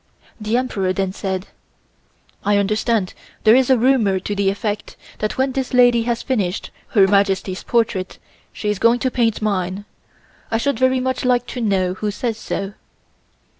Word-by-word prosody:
The 215 +2 0
Emperor 195 -7 -1
then 190 -1 -1
said: 190 -1 -3 1.0
"I 205 0 +3
understand 210 0 0 0.3
there 220 +1 +7
is 260 0 +3
a 260 - +5
rumor 230 -6 +3
to 205 - -3
the 200 -1 +1
effect 205 +1 -4 0.2
that 215 - -2
when 265 +1 +1
this 260 -1 -2
lady 245 -1 +5
has 235 -1 -1
finished 205 -8 -2 0.3
Her 195 - +8
Majesty's 195 -1 +1
portrait 215 -6 -1 0.3
she 210 - -4
is 210 -2 -1
going 230 +1 +4
to 255 +1 -1
paint 225 -4 0
mine. 195 -1 -1 0.6
I 225 - +1
should 260 0 -1
very 260 0 +3
much 260 0 -2
like 245 -1 +2
to 250 - -4
know 190 -4 +1
who 210 +3 -3
says 225 +2 -3
so." 195 -1 -4
215 Hz, 170 wpm, -20 LUFS, 195-245 Hz, 1.0 s, Her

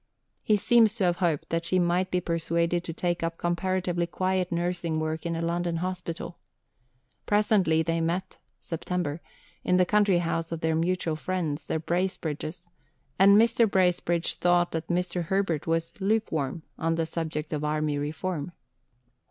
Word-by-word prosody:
He 215 - +3
seems 225 0 +4
to 220 - -1
have 175 -1 +2
hoped 165 -3 0
that 165 0 0
she 185 +3 +1
might 180 +1 +2
be 180 - +1
persuaded 170 0 0
to - - -3
take 175 +1 -1
up 165 0 -2
comparatively 175 0 -1
quiet 185 +2 -1
nursing 170 -2 -1
work 155 +2 -2
in 170 - -2
a 165 - -2
London 170 0 -1
hospital. 175 -1 -4 0.9
Presently 205 -6 +3
they 165 +1 0
met 175 +3 -2 0.2
(Sept.) 165 -2 -3 0.4
in 180 - +3
the 180 - +4
country 205 -1 +3
house 165 -1 -1
of 165 -1 -4
their 160 0 +1
mutual 170 0 0
friends, 160 -2 -3
the - - 0
Bracebridges, 170 -1 -3 0.5
and 200 +1 +7
Mr. 230 0 +4
Bracebridge 180 -3 +1
thought 175 0 +3
that 160 0 -3
Mr. 180 0 -1
Herbert 175 -4 0
was 165 0 0
"lukewarm" 170 -8 -1 0.2
on 165 +1 +1
the 165 0 0
subject 160 -1 -4
of 150 0 -2
Army 150 -1 0
Reform. 155 +2 -3
170 Hz, 155 wpm, -27 LUFS, 165-185 Hz, 0.9 s, and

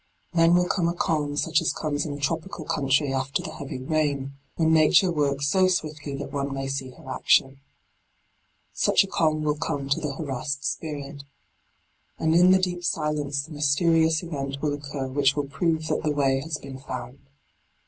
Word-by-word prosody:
Then 165 0 +5
will 180 0 +3
come 175 -2 +1
a 170 - -1
calm 150 -4 -1
such 160 +1 +2
as - - +1
comes 150 -1 -2
in 145 - -4
a 145 - -7
tropical 160 +3 -3
country 140 0 +1
after 135 +1 -1
the - - -6
heavy 140 -2 -6
rain, 140 -2 -1 0.2
when 160 -1 +2
Nature 160 +4 +5
works 140 -3 0
so 185 +5 +4
swiftly 155 -5 -2
that - - -6
one 140 0 -2
may 135 0 -3
see 135 -1 -3
her 125 - -15
action. 135 0 +2 1.1
Such - - +3
a - - -6
calm 155 -4 +1
will 150 0 0
come 140 -1 -3
to 140 - +2
the 145 -3 -3
harassed 140 -1 -3
spirit. 145 -2 -4 1.0
And 160 0 +1
in 175 +2 +6
the 190 - +7
deep 180 -1 -2
silence 150 -4 -1
the 160 - -13
mysterious 160 +3 +2
event 140 -4 -4
will 150 0 -1
occur 140 -1 -5
which 140 +1 +2
will 145 -1 -1
prove 160 +3 -1
that - - 0
the 155 - 0
way 135 -2 +2
has 155 +2 -4
been 135 -2 -9
found. 125 0 -7
145 Hz, 185 wpm, -25 LUFS, 140-160 Hz, 1.1 s, the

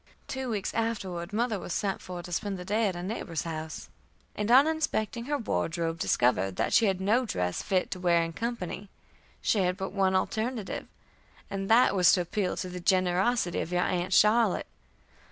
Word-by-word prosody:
Two 265 -1 -4
weeks 210 -4 -2
afterward 195 -6 -2
mother 220 -1 0
was 175 - -5
sent 195 -2 -1
for 180 -1 -7
to 175 - -9
spend 195 +3 -2
the 180 - -8
day 210 +3 +1
at 190 - -2
a 175 - -5
neighbor's 180 -5 -3
house, 160 -1 -6 0.5
and 210 +1 -2
on 260 +4 +7
inspecting 245 -8 -1
her 290 +2 0
wardrobe, 165 - -2
discovered 95 - +1
that - - -1
she 225 - +5
had 190 -2 0
no 215 +7 +2
dress 90 - -2
fit 185 -3 0
to 185 - -4
wear 170 -2 +3
in 165 0 -4
company. 205 -3 -4 0.5
She 215 - +2
had 180 -1 +1
but 190 -1 -4
one 190 -1 +2
alternative, 220 +3 -2 0.6
and 195 0 -3
that 235 +3 +5
was 180 -2 +6
to 180 - +3
appeal 185 +2 -2
to 185 - -3
the 180 0 -6
generosity 185 +2 +1
of 170 - -5
your 180 0 +2
aunt 180 0 -1
Charlotte. 210 +1 +4
190 Hz, 190 wpm, -28 LUFS, 175-220 Hz, 0.6 s, on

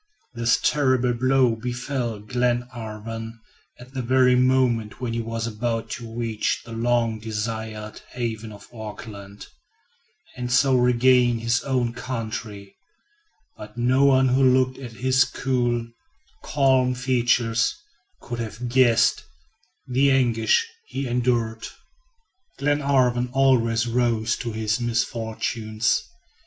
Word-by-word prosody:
This 115 -1 +2
terrible 130 -4 +2
blow 130 -1 +2
befell 120 -1 -3
Glenarvan 115 -1 -3 0.4
at 125 +2 -14
the 130 - -3
very 125 +1 +4
moment 125 -4 +1
when 125 -3 -3
he 115 - -1
was 115 0 -4
about 115 0 -3
to 115 -2 -6
reach 115 -2 -1
the 115 - -11
long 115 -1 0
desired 110 0 -5
haven 115 -3 -4
of 105 -1 -13
Auckland, 105 -2 -9 0.9
and 125 -1 -4
so 130 +1 +4
regain 125 0 +4
his 115 +2 0
own 125 -3 -1
country; 110 -5 -6 0.8
but 105 +2 -11
no 125 +3 +3
one 130 -1 +4
who 130 +2 +2
looked 130 0 +3
at 125 -4 -8
his 130 +2 +3
cool, 120 -4 -1 0.6
calm 130 -3 +2
features, 125 - +1 0.5
could 120 -2 -6
have 115 +2 -5
guessed 120 -2 +3 0.6
the 135 +2 +2
anguish 125 - +2 0.2
he 135 - -4
endured. 120 -2 -1 0.9
Glenarvan 135 -4 +1
always 120 -4 +3
rose 115 -2 +1
to 120 - -4
his 110 +1 -1
misfortunes. 115 -1 -1
120 Hz, 115 wpm, -23 LUFS, 115-130 Hz, 0.9 s, very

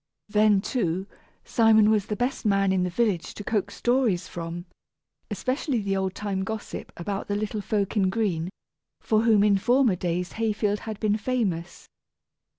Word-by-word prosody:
Then, 210 -1 +4
too, 190 -6 -1 0.4
Simon 220 -2 +5
was 210 -3 +1
the 210 - -2
best 245 +4 -2
man 195 -3 +2
in 190 -1 +2
the 180 - 0
village 195 -2 -1
to 205 - -7
coax 200 -1 -1
stories 240 -8 +1
from, 170 +1 -6 0.6
especially 265 0 -1
the 200 -2 -1
old 190 -1 -1
time 200 -2 -2
gossip 220 +2 -6
about 195 +3 -4
the 205 - -1
little 210 0 -2
folk 200 0 -1
in 195 -3 +3
green, 185 -6 -1 0.5
for 215 -1 +2
whom 220 -3 +4
in 200 -2 +4
former 245 -1 +3
days 175 0 -2
Hayfield 210 -2 0
had 215 -2 -6
been 215 -1 +1
famous. 205 -8 -2
205 Hz, 160 wpm, -26 LUFS, 190-220 Hz, 0.6 s, Simon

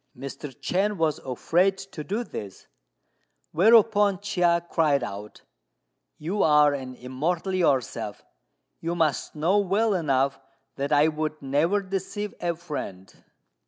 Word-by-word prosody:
Mr. 140 +3 -7
Chên 200 +3 0
was 160 -3 +1
afraid 175 +9 +1
to 190 -5 -8
do 210 +9 -2
this; 100 - -8 0.9
whereupon 205 +1 +5
Chia 180 -4 +2
cried 150 -6 +2
out, 105 -1 -8 0.7
"You 185 +7 -2
are 150 -1 +5
an 130 -2 -6
Immortal 155 +10 -2
yourself; 140 -9 0 0.6
you 170 +1 -3
must 160 -4 0
know 170 +7 +2
well 205 +3 +1
enough 140 -5 +1 0.4
that 140 +1 -3
I 150 +1 +5
would 155 0 -3
never 160 +9 +1
deceive 195 +2 -4
a 170 -1 -1
friend." 145 - -7
165 Hz, 125 wpm, -25 LUFS, 140-195 Hz, 0.9 s, whereupon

